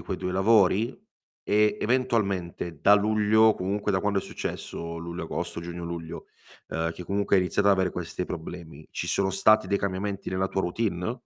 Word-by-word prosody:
quei - - -4
2 90 - -3
lavori? 100 +2 +3 0.4
E 105 +1 +2
eventualmente 100 - -1
da 100 - +7
luglio, 110 +1 +4
comunque 100 +2 -2
da 95 - +1
quando 100 0 +1
è - - -2
successo, 85 0 -6
luglio 85 +1 -5
agosto, - - -4
giugno 85 0 -6
luglio, 85 -1 -6 0.4
uhm, 80 0 -1
che 90 - -9
comunque 100 +1 +1
hai 95 - +4
iniziato 100 +2 +1
ad 100 - +6
avere 95 -1 +1
questi 90 +1 -4
problemi. 80 -3 -8
Ci - - -4
sono 95 -1 +1
stati 110 +3 +4
dei 100 - +1
cambiamenti 100 +1 -3
nella 95 0 0
tua 95 - -1
routine? 90 +2 -1
95 Hz, 175 wpm, -26 LUFS, 85-105 Hz, 0.4 s, da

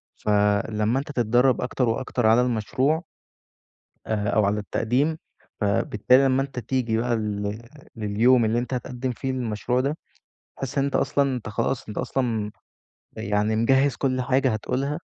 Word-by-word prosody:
فلمّا 105 +3 +1
أنت 145 - -6
تتدرّب 120 +1 +2
أكتر 125 -1 0
وأكتر 120 +1 -1
على 115 +3 +5
المشروع 130 - 0 1.0
آآ، 105 -2 -1
أو 105 -1 +3
على 105 +1 +1
التقديم 130 +9 0 0.4
فبالتالي 105 +5 +3
لمّا 135 0 +3
أنت 135 -2 -4
تيجي 120 -1 -1
بقى 120 +1 0
لل 105 0 -3 0.3
لليوم 115 +3 +3
اللي 115 +2 +1
أنت 125 +2 -4
هتقدّم 125 +1 -3
فيه 130 +2 -3
للمشروع 125 0 -1
ده، 145 +4 -2 0.6
هتحس 135 +2 -5
أنت 140 0 +1
أصلًا 140 -2 +1
أنت 115 -3 -6
خلاص 115 +3 -2
أنت 105 - -8
أصلًا 115 -5 -1 0.7
يعني 105 +1 0
مجهّز 135 +4 +3
كل 130 -2 0
حاجة 130 0 +2
هتقولها، 135 +7 -2
120 Hz, 145 wpm, -24 LUFS, 110-130 Hz, 1.0 s, على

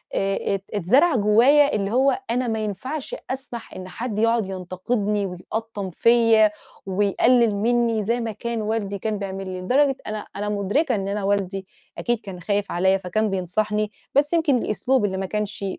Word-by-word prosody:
آآ 195 0 0
ات 195 - -6
اتزرع 250 - +3
جوّايا 245 +7 +5
اللي 200 -1 -1
هو 270 +8 +3
أنا 250 +1 0
ما 220 -1 -1
ينفعش 260 - -4 0.2
أسمح 260 -3 -6
إن 185 0 -8
حد 225 0 -4
يقعد 230 -1 +2
ينتقدني 200 +3 -2
ويقطّم 200 +2 -5
فيَّ، 230 +2 +5 0.4
ويقلِّل 205 +4 +3
مني 230 +1 +1
زي 230 +4 0
ما 230 -1 -2
كان 230 +2 -4
والدي 210 -2 -2
كان 215 0 -2
بيعمل 195 -1 -5
لي، 185 0 -5
لدرجة 270 +7 +2
أنا 215 0 -5
أنا 205 +1 -3
مُدرِكة 210 - 0
إن 195 -2 -3
أنا 200 +1 -2
والدي 195 -1 -1 0.3
أكيد 240 -2 0
كان 195 -4 -9
خايف 200 +3 -1
عليَّ 190 +2 +2
فكان 210 +4 -1
بينصحني، 210 +3 -1 0.2
بس 290 +3 +3
يمكن 320 -6 +3
الأسلوب 245 +1 +1
اللي 190 -2 -2
ما 190 - -2
كانش 210 0 -3
210 Hz, 165 wpm, -23 LUFS, 195-240 Hz, 0.4 s, جوّايا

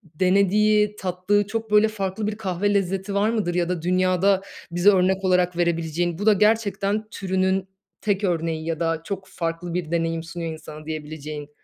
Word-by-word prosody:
denediği, 205 +4 +3
tattığı 190 +2 0
çok 225 +1 -4
böyle 210 +1 +6
farklı 205 -1 -3
bir 210 - -2
kahve 200 -1 -1
lezzeti 195 0 -1
var 200 +2 +2
mıdır 210 -7 -1
ya 175 -1 +1
da 180 -2 -2
dünyada 185 +2 +2 0.3
bize 175 +4 +4
örnek 190 0 +3
olarak 180 -1 +2
verebileceğin? 170 0 0
Bu 205 - -4
da 215 - +7
gerçekten 210 0 +1
türünün 190 0 0 0.3
tek 205 -1 0
örneği 165 -3 -1
ya 165 -1 -2
da 165 -1 0
çok 190 +1 -5
farklı 165 -1 -4
bir 170 -3 -3
deneyim 165 -1 0
sunuyor 165 0 -5
insana 155 -1 -10
diyebileceğin. 150 -1 -6
185 Hz, 165 wpm, -23 LUFS, 165-200 Hz, 0.3 s, da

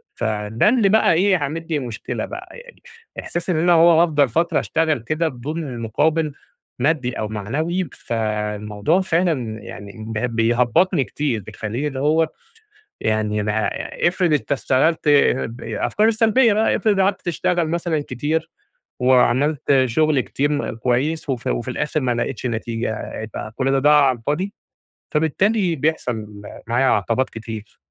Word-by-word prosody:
فده 110 - 0
اللي 230 -5 +3
بقى 220 -4 +4
إيه 185 +2 +3
عامل 160 +3 -4
لي 155 -3 0
مشكلة 120 -4 -4
بقى - - -8
يعني، 485 0 -15 0.4
احساس 175 +1 -5
إن 175 - +2
أنا 175 +2 +3
هو 165 0 +6
هافضل 145 -6 +3
فترة 165 +8 +1
اشتغل 160 -4 0
كده 155 +8 -1
بدون 150 +5 -5
المقابل 145 +5 -1 0.5
مادي 135 -2 +1
أو 110 - -2
معنوي، 155 - -2
فالموضوع 105 - -1
فعلًا 160 -12 0
يعني 100 -1 -9
ب 110 - -5 0.2
بيهبطني 120 - +2
كتير 130 -8 -2
بيخليني 110 +7 -4
اللي 135 -2 -5
هو، 155 +3 +2 0.7
يعني 105 -1 0
أنا 105 +1 0 0.4
إفرض 175 -2 +1
أنت 140 -2 -1
اشتغلت 135 +6 +2 0.5
ب 120 +2 -11
الأفكار 215 +1 0
السلبية 225 +1 +4
بقى، 215 +2 +2
إفرض 205 -3 +1
قعدت 195 +1 +2
تشتغل 175 -1 0
مثلًا 165 -2 -1
كتير، 160 +5 -2 0.5
وعملت 130 +2 +3
شغل 150 +3 +2
كتير 145 +3 -1
م 145 -4 -2
كويس، 135 +7 -1
وفي 125 -3 -2
وفي - - -2
الآخر 155 +1 -1
ما 125 -3 0
لقيتش 125 +1 -3
نتيجة، 115 -1 -3
يبقى 110 0 -7
كل 135 0 0
ده 135 - +2
ضاع 145 +1 +5
على 125 -2 0
الفاضي؟ 155 - -2 0.6
فبالتالي 175 +4 +1
بيحصل 115 -9 -2 0.3
معايا 125 +3 +2
عقبات 115 +4 +1
كتير. 110 -1 -8
145 Hz, 145 wpm, -21 LUFS, 115-165 Hz, 0.7 s, هو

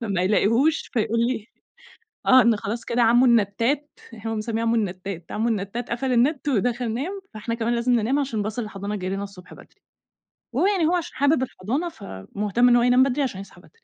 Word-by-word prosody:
فما 200 -6 -1
يلاقيهوش 230 - +2
فيقول 230 -1 0
لي 235 -2 -1 0.8
آه 260 0 +7
إن 235 -1 +4
خلاص 215 +3 -5
كده 240 +1 0
عمو 240 +2 +5
النتات، 235 +6 +1 0.3
هو 225 - -2
مسميه 220 +1 -2
عمو 230 0 +1
النتات، 185 -4 -4
عمو 220 +2 -1
النتات 225 +3 -3
قفل 255 +2 -1
النت 265 +5 +1
ودخل 240 0 0
نام، 360 - -4
فإحنا 225 +2 -4
كمان 235 0 -1
لازم 235 +1 0
ننام 240 +5 +1
عشان 255 -7 -2
باص 215 +3 -4
الحضانة 210 -2 -4
جاي 185 -2 -4
لنا 195 +1 -3
الصبح 195 -3 -11
بدري، - - -17 0.7
وهو - - +2
يعني 390 -5 +2
هو 340 - +2
عشان 350 -3 -3
حابب 285 0 +2
الحضانة، 260 - -3
فمُهتم 205 - -1
إن 240 - +5
هو 240 - +4
ينام 250 +1 +5
بدري 270 +2 +1
عشان 235 -8 -3
يصحى 195 -2 -12
بدري. - - -20
230 Hz, 195 wpm, -23 LUFS, 205-255 Hz, 0.8 s, آه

